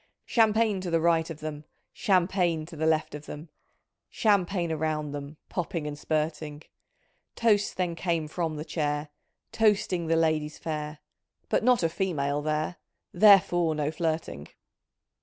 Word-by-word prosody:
"Champagne 220 -3 +2
to 185 - -4
the 165 -1 +2
right 165 0 +2
of 160 -1 -8
them. 155 -1 -5 0.3
Champagne 180 -4 +1
to 165 - -11
the 160 +1 0
left 160 -2 +1
of 150 0 -8
them. 150 +2 -8 0.6
Champagne 190 -5 +1
around 155 -1 -2
them. 145 +1 -7
Popping 170 -3 -3
and 150 -1 -4
spurting. 155 0 -3 0.7
Toasts 210 -3 +2
then 180 -2 -1
came 165 -2 -1
from 160 0 -3
the 150 +1 -5
chair. 150 -2 -2 0.4
Toasting 200 -6 +1
the 165 - +2
ladies 155 -2 +1
fair, 150 -1 -4 0.5
But - - +1
not 250 -4 +4
a - - +4
female 150 -6 -1
there. 155 +3 -2 0.4
Therefore 175 -4 +5
no 150 0 -1
flirting. 160 - -3
160 Hz, 140 wpm, -27 LUFS, 150-180 Hz, 0.7 s, Therefore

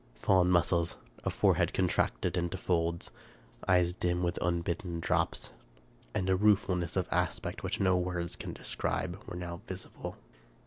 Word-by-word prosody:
Fallen 90 +8 +4
muscles, 85 -1 +2 0.3
a - - +1
forehead - - +2
contracted - - +1
into 85 +1 -1
folds, 85 -2 0 0.6
eyes 90 -1 +4
dim 90 0 0
with 85 0 -1
unbidden 85 0 -1
drops, - - 0 0.6
and 95 - 0
a 95 - +4
ruefulness 95 -4 +2
of 95 -2 +1
aspect 90 0 -1
which - - -2
no 95 -1 +4
words 90 -1 -1
can - - -6
describe, 90 +1 -2
were 90 - -5
now 85 0 -5
visible. 95 0 -7
90 Hz, 140 wpm, -31 LUFS, 85-90 Hz, 0.6 s, Fallen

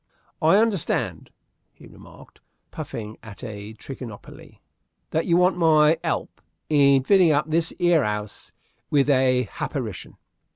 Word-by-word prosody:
"I 160 +5 +5
hunderstand," 215 -6 -1 0.4
he - - -18
remarked, - - -16 0.3
puffing 110 -1 -7
at 110 +1 -12
a 105 -2 -8
trichinopoly, 120 -3 -11 0.5
"that 160 - -1
you 170 -1 +3
want 180 0 +3
my 160 -2 +4
'elp - - -3 0.3
in 140 -2 +4
fitting 185 +1 +4
up 150 +1 0
this 165 +1 0
'ere 175 -4 +3
'ouse 105 -1 -5 0.4
with 145 -1 +2
a 130 -1 +3
happarition." 105 - -6
145 Hz, 125 wpm, -23 LUFS, 120-165 Hz, 0.5 s, I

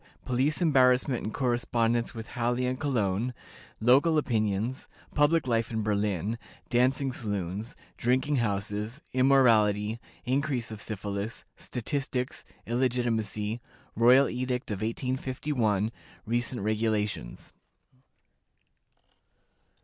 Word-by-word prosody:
Police 135 +7 +1
Embarrassment, 130 -4 +3
and 110 - -3
Correspondence 120 -2 0
with 115 0 -7
Halle 120 +1 0
and 125 0 -1
Cologne. 120 -4 0 0.4
Local 140 +8 +5
Opinions. 110 -2 0 0.3
Public 150 +2 +3
Life 115 -2 +1
in 110 -2 -2
Berlin. 105 +1 0 0.3
Dancing 130 +2 +2
Saloons. 105 -2 -4 0.2
Drinking 130 +4 +1
Houses. 105 +2 -2
Immorality. 115 -5 +4 0.3
Increase 130 -2 0
of 105 -1 -6
Syphilis. 105 +1 -4
Statistics. 125 +1 -3 0.2
Illegitimacy. 115 -3 0 0.3
Royal 125 +4 +6
Edict 125 -1 -2
of 100 - -3
1851. 125 -2 -1 0.3
Recent 120 +1 -1
Regulations. 105 - -1
120 Hz, 90 wpm, -28 LUFS, 110-130 Hz, 0.4 s, Royal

